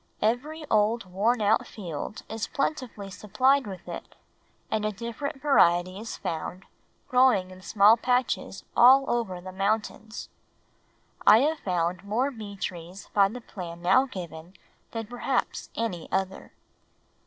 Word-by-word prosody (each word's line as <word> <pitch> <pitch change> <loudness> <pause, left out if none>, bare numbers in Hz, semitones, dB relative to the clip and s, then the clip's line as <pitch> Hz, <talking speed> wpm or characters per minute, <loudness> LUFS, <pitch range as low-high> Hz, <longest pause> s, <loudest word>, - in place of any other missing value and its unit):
Every 295 +8 -1
old 215 0 +2
worn 210 +5 +1
out 210 +2 +3
field 180 0 -6
is 220 -1 -4
plentifully 250 -9 -3
supplied 255 +7 +2
with 190 -3 -8
it - - -8 0.6
and 215 - 0
a 215 - 0
different 235 +6 -5
variety 185 - +3
is 225 +1 -6
found 170 +3 -5 0.4
growing 250 -8 +4
in 185 0 -12
small 210 +3 +5
patches 245 -4 0
all 265 +3 +7
over 225 -7 -1
the 185 +1 -8
mountains. 215 +2 -2 1.0
I 215 +3 +9
have 310 +3 +1
found 175 -1 -1
more 235 +7 0
bee 215 -5 -8
trees 180 0 -6
by 200 -1 +5
the 245 +5 -7
plan 175 -6 -8
now 260 +9 +4
given 175 - -8 0.3
than 225 -1 -4
perhaps 245 +3 -2
any 205 -8 -3
other. 190 0 -2
210 Hz, 135 wpm, -27 LUFS, 185-245 Hz, 1.0 s, I